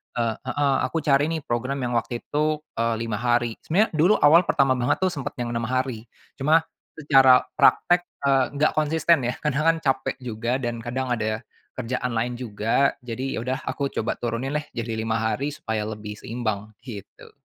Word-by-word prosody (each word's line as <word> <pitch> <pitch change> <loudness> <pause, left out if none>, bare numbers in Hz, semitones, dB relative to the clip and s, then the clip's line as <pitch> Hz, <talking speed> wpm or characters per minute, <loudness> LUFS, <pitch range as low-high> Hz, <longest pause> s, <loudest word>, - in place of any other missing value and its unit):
eee 115 -2 0
heeh, 140 +1 +1
aku 155 +4 -1
cari 145 0 +3
nih, 160 -3 -3
program 130 +3 -2
yang 120 - -1
waktu 120 +1 -6
itu, 150 +1 0 0.2
eee, 115 0 +1
5 110 -2 -3
hari. 120 -1 0
Sebenarnya, 200 +7 +1
dulu 170 +6 +4
awal 165 +4 +5
pertama 130 -2 +2
banget 120 - +2
tuh, 185 - +2
sempat 140 -5 -5
yang 120 -1 -3
6 115 -1 -2
hari, 130 -2 -2 0.3
cuma, 155 +4 +4 0.3
secara 135 -4 +5
praktek, 175 0 +4 0.2
eee, 135 -1 +4
enggak 145 +2 +2
konsisten 160 +1 +3
ya, 120 +1 0
kadang 150 0 0
kan, 165 0 +4
capek 135 -2 0
juga, 120 +1 -2
dan, 120 -2 -3
kadang 130 +2 -3
ada 110 -2 -1 0.4
kerjaan 125 0 -2
lain 120 +2 -1
juga. 115 +3 +1
Jadi, 125 +2 -4
ya - - -2
udah, 130 +3 -2
aku 140 -1 -1
coba 115 - -2
turunin 120 +3 -2
deh, 150 - -9
jadi 115 -1 -3
5 110 0 -1
hari, 130 +6 -1
supaya 110 -1 -3
lebih 105 -1 -6
seimbang, 110 -3 -4
gitu. 105 -6 -10
125 Hz, 180 wpm, -24 LUFS, 115-145 Hz, 0.4 s, awal